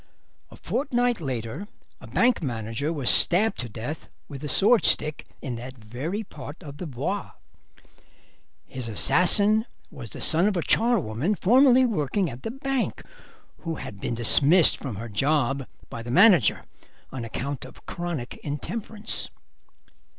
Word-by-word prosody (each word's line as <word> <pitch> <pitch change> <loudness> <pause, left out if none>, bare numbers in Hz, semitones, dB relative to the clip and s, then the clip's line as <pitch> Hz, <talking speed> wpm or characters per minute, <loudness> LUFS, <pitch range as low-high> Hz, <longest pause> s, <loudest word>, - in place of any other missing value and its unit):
A - - -14
fortnight 245 - -1
later 130 - -5 0.3
a - - -13
bank 245 -3 +2
manager 115 +2 -3
was 145 -6 -4
stabbed 210 +6 +4
to 120 - -5
death 120 +9 -7 0.2
with 140 -1 -9
a - - -3
swordstick 195 - +3 0.2
in 125 -4 -4
that 130 +2 -9
very 130 - -5
part 150 -2 -11
of 145 -2 -10
the 175 - -6
Bois. 130 -5 -4 1.4
His 125 -3 -7
assassin 200 - +3 0.2
was 120 -5 -9
the - - -10
son 165 +5 +3
of 205 -3 0
a 170 - -1
charwoman 195 - +1
formerly 255 +6 +5
working 185 - -1
at 120 +1 -10
the - - -5
bank, 270 +1 -3 0.6
who 165 -1 -5
had 100 -8 -9
been 120 - -3
dismissed 145 - +6
from 130 -7 -7
her 115 +4 -7
job 135 +3 0 0.2
by 115 - -8
the 120 - -8
manager 180 - +4 0.5
on 130 -2 -6
account 135 +4 -5
of 130 - -14
chronic 170 -8 -5
intemperance. 205 +9 -5
150 Hz, 145 wpm, -25 LUFS, 125-205 Hz, 1.4 s, dismissed